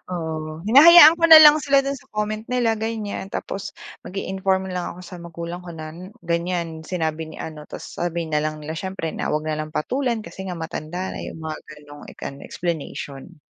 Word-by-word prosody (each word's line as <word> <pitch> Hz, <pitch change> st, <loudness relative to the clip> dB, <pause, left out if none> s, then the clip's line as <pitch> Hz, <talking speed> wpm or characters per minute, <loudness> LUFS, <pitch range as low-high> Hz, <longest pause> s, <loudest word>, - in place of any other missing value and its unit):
Oo, 160 Hz, -2 st, -5 dB
hinahayaan 315 Hz, +6 st, +9 dB
ko -, -, +2 dB
na 320 Hz, -, +12 dB
lang 300 Hz, 0 st, +9 dB
sila 275 Hz, -1 st, +3 dB
do'n 275 Hz, 0 st, -2 dB
sa -, -, -23 dB
comment 215 Hz, +1 st, -2 dB
nila, 245 Hz, -3 st, +1 dB
ganyan. 220 Hz, -3 st, -4 dB
Tapos 195 Hz, 0 st, -5 dB, 0.3 s
mag-i-inform 190 Hz, 0 st, -2 dB
na -, -, -5 dB
lang 180 Hz, -1 st, -3 dB
ako -, -, -11 dB
sa 180 Hz, -, -9 dB
magulang 170 Hz, +1 st, -7 dB
ko 175 Hz, -, -8 dB
na, 155 Hz, -1 st, -8 dB
n 170 Hz, -, -12 dB, 0.3 s
ganyan, 170 Hz, -1 st, -2 dB
sinabi 160 Hz, -3 st, -3 dB
ni -, -, -11 dB
ano. 155 Hz, -1 st, -8 dB
Tapos -, -, -9 dB
sabi 170 Hz, -1 st, -2 dB
na 150 Hz, -1 st, +1 dB
lang 155 Hz, 0 st, -3 dB
nila, 155 Hz, -, -5 dB
siyempre, 190 Hz, -3 st, -4 dB
na -, -, -4 dB
huwag 155 Hz, +1 st, -1 dB
na 155 Hz, -1 st, -1 dB
lang 155 Hz, 0 st, -5 dB
patulan, 245 Hz, -, -1 dB
kasi 190 Hz, -, -8 dB
nga 180 Hz, -, -4 dB
matanda 165 Hz, +3 st, -5 dB
na. -, -, -7 dB
'Yong 160 Hz, -, -8 dB
mga 160 Hz, -1 st, -5 dB
gano'ng 145 Hz, -1 st, -13 dB
ek -, -, -16 dB, 0.2 s
explanation. 160 Hz, -1 st, -6 dB
175 Hz, 200 wpm, -22 LUFS, 160-210 Hz, 0.3 s, na